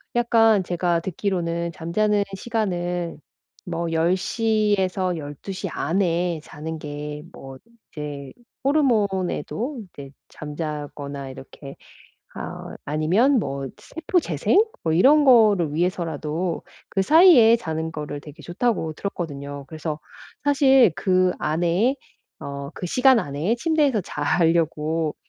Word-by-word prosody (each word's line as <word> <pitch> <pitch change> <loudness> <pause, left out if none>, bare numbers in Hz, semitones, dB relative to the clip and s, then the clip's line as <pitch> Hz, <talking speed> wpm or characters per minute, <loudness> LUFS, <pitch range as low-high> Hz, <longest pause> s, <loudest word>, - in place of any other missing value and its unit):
약간 225 -4 +4
제가 175 -1 0
듣기로는 170 -2 -2
잠자는 205 +5 +1
시간은 175 -7 -2 0.5
뭐 170 -1 -3
10:00 205 +6 +1
에서 185 -2 -1
12:00 170 +7 -6
안에 170 0 0
자는 160 +1 -7
게 150 0 -6
뭐 135 0 -10 0.3
이제 145 -3 -7 0.3
호르몬에도 240 - 0
이제 140 -1 -10 0.2
잠자거나 145 -2 -6
이렇게 135 +1 -11 0.6
아 - - -7
아니면 185 - +2
뭐 135 -6 -3
세포 325 +3 -2
재생? 385 - +1 0.2
뭐 160 - 0
이런 285 - +5
거를 210 - +5
위해서라도 165 -1 -2 0.3
그 195 - -1
사이에 295 - +7
자는 160 -5 -4
거를 150 -2 -5
되게 150 0 -13
좋다고 175 -3 -1
들었거든요. 145 -7 -5
그래서 155 +1 -5 0.5
사실 270 - +5
그 185 -1 +2
안에 175 - +1 0.5
어 140 0 -6
그 180 - -5
시간 255 +5 +4
안에 150 +10 -1
침대에서 290 - +2
자려고 160 0 0
175 Hz, 230 characters per minute, -23 LUFS, 150-215 Hz, 0.6 s, 사이에